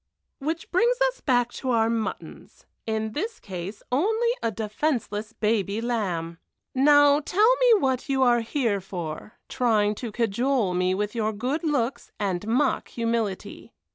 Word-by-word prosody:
_'" - - -55 0.4
"Which 325 +1 -3
brings 475 +7 +2
us - - -12
back 245 -3 +2
to 260 - -5
our 225 -2 +3
muttons 230 -1 -5 0.2
in 220 0 -1
this 430 - -4
case 190 +1 -7
only 440 - +2
a 230 - +1
defenceless 220 0 -2
baby 210 -2 0
lamb. 180 -8 -2 0.3
Now 290 +1 +5
tell 420 +10 +3
me 485 -4 +5
what 260 -3 -1
you 265 -1 +2
are 240 -2 +4
here 225 -4 -1
for, 175 +1 -6
trying 215 -4 +2
to 235 -3 -4
cajole 235 -1 0
me 180 +1 +1
with 210 +1 -2
your 220 -2 0
good 255 - -2
looks 265 -5 -1
and 195 -1 -2
mock 255 +4 +1
humility." 230 -4 -3
230 Hz, 150 wpm, -25 LUFS, 210-280 Hz, 0.4 s, Now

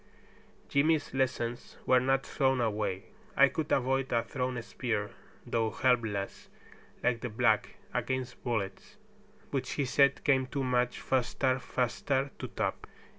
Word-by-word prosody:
Jimmy's 150 +2 +2
lessons 120 -2 -2
were 130 - +5
not 135 +1 +1
thrown 135 -2 +1
away. 105 -4 -1 0.3
I 140 0 +7
could 155 +1 -3
avoid 135 0 +1
a 115 -1 +2
thrown 125 0 -2
spear, 105 -4 -2 0.3
though 115 -1 0
helpless, 110 -3 0 0.5
like 120 -2 +1
the 120 - -3
black, 110 -1 +2 0.2
against 130 -1 -2
bullets, 120 - -3 0.5
which 135 -2 -2
he 140 - 0
said 140 +2 +3
came 130 -3 +3
"too 140 0 -2
much 125 -1 +1
faster 130 0 +1
faster 135 +2 -1
to - - -4
top." - - -3
125 Hz, 130 wpm, -31 LUFS, 115-135 Hz, 0.5 s, I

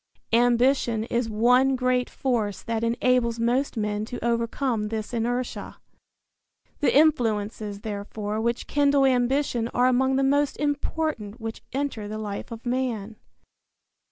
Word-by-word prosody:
Ambition 240 -1 +3
is 235 -1 0
one 250 +5 +4
great 255 -1 +1
force 225 -6 -2
that 230 -1 -2
enables 235 0 +1
most 245 +3 0
men 210 -1 -1
to 235 +2 -6
overcome 235 -1 0
this 220 +1 -4
inertia. 245 +2 -3 1.0
The 290 - +3
influences, 215 -8 +1
therefore, 210 0 -4
which 235 +1 -1
kindle 285 -1 +3
ambition 250 -1 +1
are 245 - +4
among 260 +1 +3
the 270 - +2
most 285 +1 +2
important 290 -6 -2
which 225 0 -6
enter 265 -6 -3
the 215 +1 -5
life 205 -2 -5
of 230 +1 -8
man. 240 -4 -2
240 Hz, 130 wpm, -25 LUFS, 220-260 Hz, 1.0 s, one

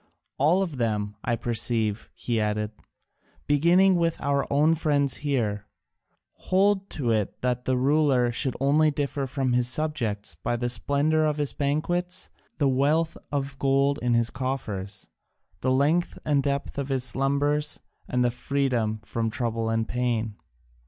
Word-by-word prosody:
All 165 +8 +4
of 165 -7 -5
them, 105 -3 -1
I 120 - +1
perceive," 115 -2 -1
he 115 -2 -1
added, 105 0 -1 0.7
"beginning 175 +6 +4
with 165 -1 0
our 140 -1 0
own 150 +3 +4
friends 145 -4 +1
here, 110 -8 -1 0.7
hold 195 +1 +1
to 125 -6 0
it 110 -3 -1
that 125 0 -1
the 130 -1 +1
ruler 135 -2 +3
should 130 +2 -1
only 150 +3 +4
differ 140 -1 -2
from 130 -1 -1
his 125 0 +2
subjects 120 - -1
by 85 +9 -2
the 120 +1 -2
splendour 145 +5 +1
of 150 -1 0
his 145 -2 -1
banquets, 175 +5 -1 0.3
the 145 - +2
wealth 145 +5 +2 0.2
of 140 -1 -3
gold 140 +1 +2
in 120 -1 +2
his 115 0 +1
coffers, 120 -7 -4 0.5
the 130 - 0
length 145 +7 +2
and 145 -2 +3
depth 140 0 -2
of 140 0 -3
his 135 -2 0
slumbers, 140 +4 0 0.3
and 125 0 +1
his 120 -1 +1
freedom 125 -4 0
from 115 +1 -2
trouble 115 -1 -2
and 115 0 0
pain. 115 -3 -1
135 Hz, 150 wpm, -26 LUFS, 120-145 Hz, 0.7 s, All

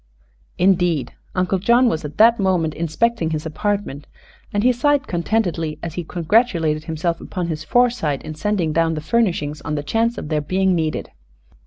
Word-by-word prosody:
Indeed, 175 -7 +2 0.2
Uncle 185 +1 +1
John 235 +6 +4
was 160 -8 -1
at 150 +1 -7
that 230 +1 +6
moment 180 -5 +1
inspecting 170 +3 0
his 155 -1 -3
apartment, 185 -3 -3 0.4
and 205 0 0
he 250 - +5
sighed 285 +2 +2
contentedly 170 -4 -1
as 165 -2 -4
he 175 - -4
congratulated 165 -3 +1
himself 165 +1 -2
upon 180 -2 -4
his 155 -1 -4
foresight 235 - +1
in 155 - -6
sending 175 -1 -1
down 165 0 +1
the 155 - -4
furnishings 155 -7 0
on 150 - -3
the 145 - -3
chance 225 +10 0
of 150 - -6
their 155 -2 0
being 185 +5 +1
needed. 160 -3 -2
170 Hz, 170 wpm, -20 LUFS, 155-210 Hz, 0.4 s, that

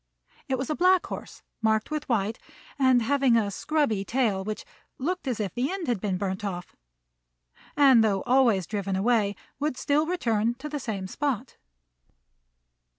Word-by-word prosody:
It 260 - +1
was 265 +4 -3
a - - 0
black 365 +2 +4
horse - - -8 0.2
marked 220 +3 +1
with 305 -1 -3
white, 220 -2 0 0.4
and 260 -3 +4
having 270 -1 +3
a 205 -3 0
scrubby 255 -5 0
tail, 215 -4 0
which 215 +1 -5 0.3
looked 350 +3 -3
as 245 -4 -1
if 200 -4 -2
the 255 +6 -1
end 385 -4 -4
had 235 -6 0
been 195 -3 -1
burnt 190 +1 -3
off; 180 -3 -5 1.0
and, 265 -6 +7
though 200 -3 +1
always 245 -7 +3
driven 200 -1 -2
away, 205 0 +2 0.2
would 290 -3 -1
still 295 +3 +1
return 235 -10 0
to 265 +5 -7
the 300 -1 -4
same 205 -7 -4
spot. 260 +3 -3
235 Hz, 160 wpm, -27 LUFS, 205-280 Hz, 1.0 s, and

